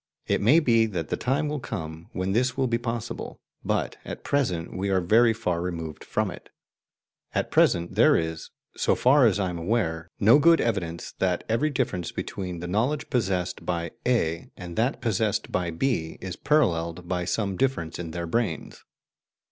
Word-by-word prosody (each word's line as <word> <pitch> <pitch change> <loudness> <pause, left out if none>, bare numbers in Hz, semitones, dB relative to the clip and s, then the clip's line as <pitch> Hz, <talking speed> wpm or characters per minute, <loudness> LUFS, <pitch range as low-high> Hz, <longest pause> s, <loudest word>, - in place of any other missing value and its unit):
It - - +1
may 130 +11 +6
be 115 -7 +3
that 85 -7 -4
the - - 0
time 135 +4 0
will 150 0 -2
come 80 -8 -6
when 95 +1 -2
this 125 +5 +1
will 135 - +2
be 115 -2 0
possible, 115 -1 -5 0.2
but - - -1
at - - -7
present 95 -13 -1
we 100 +2 -2
are 95 -1 +3
very 115 +6 +4
far 90 -7 -1
removed 80 -3 -5
from - - -1
it. - - -12 0.9
At - - -1
present, 85 0 +3
there - - +5
is, 80 -1 -3 0.3
so - - +2
far 130 0 +5
as 105 -2 +1
I 95 -2 0
am 85 - -5
aware, 85 -4 -1
no 115 +7 +6
good 165 +2 +6
evidence 85 -7 -2
that 90 -2 +1
every 115 +8 +1
difference 120 - -2
between 90 -3 -5
the 85 - -4
knowledge 125 +11 -1
possessed 95 -8 -1
by 85 -2 -2
A 85 -10 0
and 85 -1 -8
that 120 +5 0
possessed 110 -3 0
by 90 -2 0
B 80 -3 -1
is 95 -2 -5
paralleled 85 - +1
by 90 -1 -1
some 100 +2 -1
difference 90 -11 -1
in 85 -2 -4
their 85 +1 -4
brains. 85 -1 -2
95 Hz, 180 wpm, -26 LUFS, 85-120 Hz, 0.9 s, may